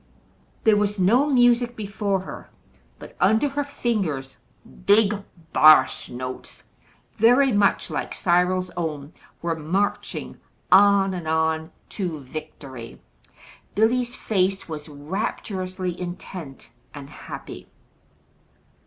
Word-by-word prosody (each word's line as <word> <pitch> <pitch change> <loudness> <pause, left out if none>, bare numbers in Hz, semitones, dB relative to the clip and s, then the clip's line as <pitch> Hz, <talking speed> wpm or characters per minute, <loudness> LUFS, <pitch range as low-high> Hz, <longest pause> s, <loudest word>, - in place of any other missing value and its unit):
There 220 -1 +5
was 205 0 0
no 230 +10 +3
music 245 -3 +3
before 200 -2 -2
her, 190 - -9 0.5
but - - -12
under 220 +9 +4
her 290 +1 -2
fingers 195 - -2 0.5
"big 205 0 +5 0.4
bass 155 0 +6
notes" 130 +1 -7 0.5
very 250 +5 +5
much 205 -2 +2
like - - -3
Cyril's 180 +1 +1
own, 155 -3 -5 0.3
were 170 -1 0
marching 185 +6 -2 0.3
on 195 0 +6
and 175 -3 -5
on 160 0 0 0.2
to 175 -6 -4
victory. 135 -4 -9 0.8
Billy's 240 +3 +1
face 195 -2 0
was 155 -1 -7
rapturously 185 +3 -4
intent 175 -5 -8 0.2
and 140 -1 -8
happy. 145 - -9
185 Hz, 100 wpm, -23 LUFS, 160-215 Hz, 0.8 s, bass